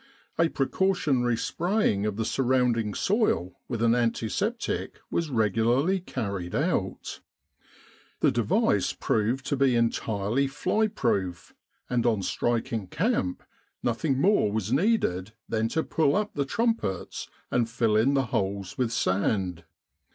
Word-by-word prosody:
A 165 0 +4
precautionary 135 -7 +1
spraying 170 - 0
of 105 - -2
the 110 +1 -2
surrounding 120 -4 +1
soil 190 - 0
with 115 -2 -2
an 115 0 +4
antiseptic 120 - -1
was 170 -2 -1
regularly 120 - +2
carried 100 - -4
out. - - -1 1.0
The - - +4
device - - +1
proved 115 +5 0
to - - 0
be 135 -2 +3
entirely 115 +2 0
fly 215 +10 0
proof, 95 - -2 0.3
and 120 -1 +1
on 110 -4 +1
striking 115 -1 -1
camp, 90 0 -1 0.4
nothing 130 +3 0
more 185 - +3
was 110 +1 -1
needed 135 - +1
than 110 0 0
to 160 +7 -1
pull 155 -2 +1
up 210 +1 -1
the 140 -2 -1
trumpets 225 - -1 0.2
and 120 -2 +1
fill 115 -2 +1
in 125 +6 +3
the 135 -1 +2
holes 100 +2 -2
with 125 -3 +1
sand. 90 -4 0
120 Hz, 130 wpm, -27 LUFS, 105-140 Hz, 1.0 s, A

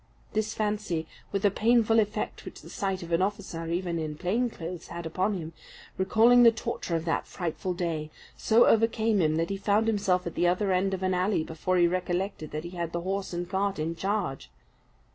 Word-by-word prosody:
This 215 0 -1
fancy, 210 -6 -1 0.3
with 200 +1 -1
the 205 - +4
painful 225 +1 +3
effect 210 -1 -2
which - - -10
the - - -11
sight 195 -2 -2
of 170 - -9
an 165 +2 +2
officer, 190 -4 -3
even 170 0 -1
in 155 -1 -4
plain 220 +9 0
clothes, 170 -4 -7
had 170 0 -7
upon 185 +5 0
him, 165 -1 -7 0.4
recalling 225 +6 +5
the 235 -1 +8
torture 220 -5 -3
of 165 0 -2
that 165 - -1
frightful 180 +1 -3
day, 165 -3 -2 0.3
so 230 +2 +4
overcame 225 -2 +3
him, 155 -1 +2
that 165 +3 0
he 195 - -2
found 205 +2 +2
himself 195 -5 +1
at 170 - -4
the 175 - +2
other 190 +3 +1
end 190 +1 +1
of 190 - -7
an 185 0 +1
alley 185 -1 +1
before 165 +4 -1
he 175 - +5
recollected 180 -2 -2
that 155 +1 -5
he 170 - -7
had 170 -2 -4
the 170 - -2
horse 195 +2 -3
and 175 0 -3
cart 195 +2 -1
in 160 +2 -2
charge. 190 - -2
185 Hz, 205 wpm, -28 LUFS, 170-205 Hz, 0.4 s, the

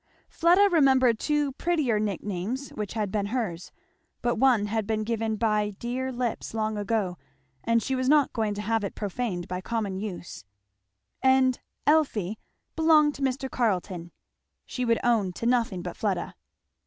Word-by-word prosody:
Fleda 355 +5 +4
remembered 265 -7 +4
two 295 -2 +1
prettier 280 -7 0
nick 205 -4 -2
names 210 +8 -3
which 210 -2 -5
had 210 -3 -2
been 200 -1 -1
hers; 205 -7 -3 0.5
but 240 -1 +1
one 245 -4 +4
had 215 0 -2
been 215 -1 0
given 225 0 -1
by 210 -1 +1
dear 255 +2 -3
lips 240 -3 -3
long 215 -1 -1
ago, 205 -4 -1 0.4
and 230 -1 +2
she 265 - -2
was 255 0 0
not 295 -2 +4
going 215 -3 -1
to 210 - -4
have 225 +1 0
it 200 - -4
profaned 200 -3 -3
by 180 0 -4
common 205 -3 -2
use; 185 - -6 0.8
and 260 -1 +4 0.3
"Elfie" 225 - +2 0.4
belonged 310 -2 +5
to 280 - -10
Mr. 265 0 -1
Carleton. 185 -8 -1 0.5
She 250 - -3
would 230 -1 +3
own 215 -6 +2
to 230 - -6
nothing 230 -7 +1
but - - -5
Fleda. - - -2
225 Hz, 160 wpm, -27 LUFS, 205-260 Hz, 0.8 s, belonged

